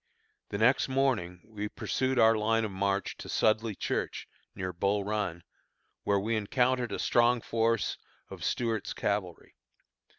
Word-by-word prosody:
The 100 - -3
next 125 +5 +3
morning 125 -10 0
we 105 -1 -5
pursued 130 +4 -1
our 115 0 +6
line 115 +1 +1
of 105 - -4
march 100 +1 -1
to - - -9
Sudley 110 0 +1
Church, - - -3 0.3
near 95 -1 -4
Bull 100 +3 0
Run, 100 -5 -2 0.6
where 100 -1 +3
we 110 +3 -1
encountered 125 +2 +1
a - - -2
strong 120 +1 +3
force 115 -1 0 0.3
of - - -9
Stuart's 115 -4 -1
cavalry. 100 -4 -3
110 Hz, 140 wpm, -30 LUFS, 100-115 Hz, 0.6 s, our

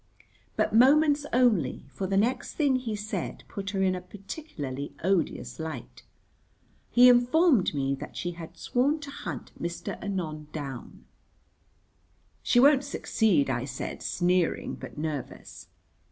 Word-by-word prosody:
But - - 0
moments 290 +4 +5
only, 220 - +2
for 190 - -3
the 195 +1 0
next 245 +5 0
thing 285 -4 +2
he 235 -4 -3
said 210 +1 -4
put 200 -1 -5
her 195 -1 0
in 185 -1 +3
a 180 - -4
particularly 180 - -7
odious 185 -2 0
light. 160 0 -6 0.9
He 245 +1 +7
informed 250 - +4
me 135 -1 0
that 135 - -7
she 175 - -2
had 170 0 -10
sworn 275 - +1
to 285 -1 -7
hunt - - -6
Mr. 170 0 -5
Anon 160 -7 -4
down. 135 -5 -7 1.4
"She 245 - +3
won't 280 +1 +6
succeed," 220 - +1
I 130 -1 -1
said, 135 -1 -5
sneering 180 -1 0
but - - -9
nervous. 150 -2 -6
195 Hz, 135 wpm, -28 LUFS, 160-250 Hz, 1.4 s, He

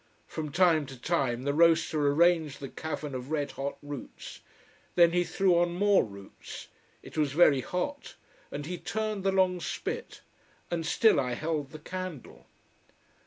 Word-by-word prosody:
From 155 -2 -5
time 165 -4 +3
to 130 -2 -10
time 130 -5 0
the 140 +1 0
roaster 160 -2 +3
arranged 160 -2 +3
the 135 -2 -6
cavern 150 -2 -5
of 130 +1 -5
red 145 -3 -1
hot 140 +1 -4
roots. 145 -2 -8 0.6
Then 170 -1 +6
he 175 +1 +2
threw 175 +1 +2
on 175 0 +1
more 200 +1 +4
roots. 100 -2 -10 0.3
It - - -6
was 145 -3 +1
very 145 -4 +5
hot. 285 - -4 0.4
And 145 - -5
he 175 +2 -5
turned 215 -2 -3
the 195 - +2
long 185 -1 +2
spit, - - -5 0.5
and 165 -2 -2
still 220 0 +4
I 125 -2 -1
held 150 -1 -2
the 155 - -9
candle. 185 -2 -7
160 Hz, 160 wpm, -29 LUFS, 140-180 Hz, 0.6 s, Then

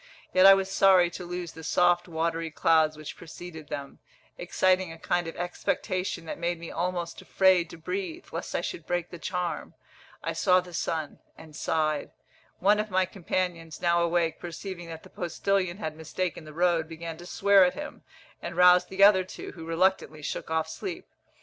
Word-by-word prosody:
yet 185 +1 +7
I 195 - +10
was 195 0 -2
sorry 185 -3 +5
to 180 +1 -7
lose 175 -1 -5
the 160 - -11
soft 175 +2 +3
watery 165 0 -1
clouds 155 0 +3
which 155 -1 -8
preceded 160 -2 -10
them, 140 -1 -6 0.4
exciting 185 0 +1
a 165 - -9
kind 175 +1 -1
of 165 - -6
expectation 180 0 -2
that 160 - -6
made 170 0 -1
me 170 - -7
almost 175 -1 -3
afraid 185 -3 +3
to - - -10
breathe, 350 - -4
lest - - -5
I - - +1
should 365 - -6
break 175 -1 -2
the 175 - -8
charm. 180 -1 -3 0.5
I - - -2
saw 185 -1 +4
the 180 -1 -9
sun 160 -1 -3 0.2
and 155 -2 -13
sighed. 155 -2 0 0.5
One 205 +3 +3
of 215 0 -2
my 185 0 +2
companions, 175 -3 -3
now 170 0 +2
awake, 170 -1 +1
perceiving 175 +1 -7
that 160 -1 -8
the - - -15
postillion 185 +1 -1
had 160 -7 -4
mistaken 160 +1 -4
the 155 - -10
road, 170 -2 +2
began 165 0 -6
to 175 +1 -11
swear 200 0 +5
at 180 - +2
him, 295 0 -7 0.4
and 170 0 -6
roused 180 0 +6
the 195 +1 +2
other 200 -2 +7
two, 185 - -8
who 165 -2 -10
reluctantly 165 -3 +1
shook - - -4
off 160 0 0
sleep. 360 - -6
175 Hz, 185 wpm, -28 LUFS, 165-185 Hz, 0.5 s, I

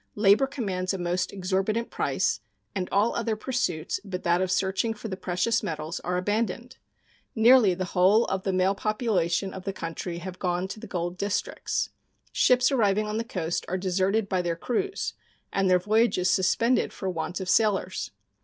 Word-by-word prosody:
Labor 210 +5 +5
commands 195 -9 -2
a - - -3
most 180 +1 -1
exorbitant 195 +4 -1
price, - - 0 0.3
and 185 -2 -3
all 205 +4 +2
other 230 -1 0
pursuits 210 -9 -2
but 190 -3 -5
that 175 +1 +2
of 185 - 0
searching 190 +4 0
for 220 +1 -7
the 190 - -3
precious 185 +5 0
metals 155 0 -4
are 180 0 -2
abandoned. 220 +5 -2 0.6
Nearly 225 -4 +6
the 185 +1 -2
whole 190 +5 +4
of 190 -1 -2
the 195 - -1
male 185 +1 +2
population 195 -4 0
of 190 - -7
the 195 - -2
country 170 0 -5
have 180 +1 -7
gone 180 0 -1
to 215 - -6
the 225 - -9
gold 175 -1 -3
districts. 200 0 -2 0.4
Ships 250 +1 +4
arriving 215 -5 +2
on 210 +1 -3
the - - -1
coast 175 -7 -3
are 185 - -1
deserted 190 +3 +1
by 185 -2 0
their 170 -1 -1
crews 315 - -2 0.4
and 195 -1 +2
their 180 - +6
voyages 205 -1 +2
suspended 230 +6 +2
for 190 - -6
want 180 +1 -3
of 190 - -5
sailors. 210 0 +1
190 Hz, 175 wpm, -26 LUFS, 180-220 Hz, 0.6 s, Nearly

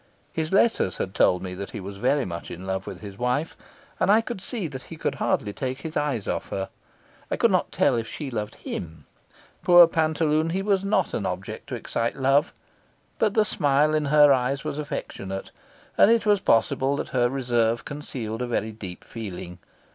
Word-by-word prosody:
His 160 -1 -2
letters 195 - +2
had 95 - -3
told 90 -1 +3
me 90 -1 -5
that 100 +2 -6
he 110 - -6
was 100 +1 -8
very 135 +3 +2
much 85 -1 -6
in 90 +3 -8
love 95 0 -3
with - - -7
his 100 -2 -9
wife, 125 +6 0 0.4
and - - +2
I 220 +2 +5 0.2
saw 205 -1 -3
that 130 -3 -7
he 165 - -7
could - - -1
hardly 105 - 0
take 130 +3 -4
his 160 +1 -6
eyes 145 -8 -1
off - - -2
her. 95 0 -3 0.6
I - - 0
could - - +3
not - - +1
tell - - +3
if 115 -1 -2
she 140 +1 -6
loved 105 -2 -4
him. 80 -3 -7 0.6
Poor 175 -1 +9
pantaloon, 160 -1 +1
he 190 +1 -1
was 195 -2 +2
not 200 +2 +1
an - - -1
object - - -5
to - - -4
excite 115 0 -2
love, 135 +2 +3 0.7
but 215 -2 +2
the 215 -1 +4
smile 150 -4 +2
in 155 -1 +1
her 145 0 +6
eyes 135 +1 0
was 150 -1 -4
affectionate, 100 - -5 0.5
and - - +8
it 230 -1 +3
was 205 -1 +4
possible 130 - +2
that - - -4
her 120 -1 +2
reserve 120 -3 0
concealed 125 -6 -5
a 125 - -1
very 110 -2 -1
deep 95 -5 -9
feeling. 90 -5 -7
135 Hz, 195 wpm, -25 LUFS, 105-155 Hz, 0.7 s, Poor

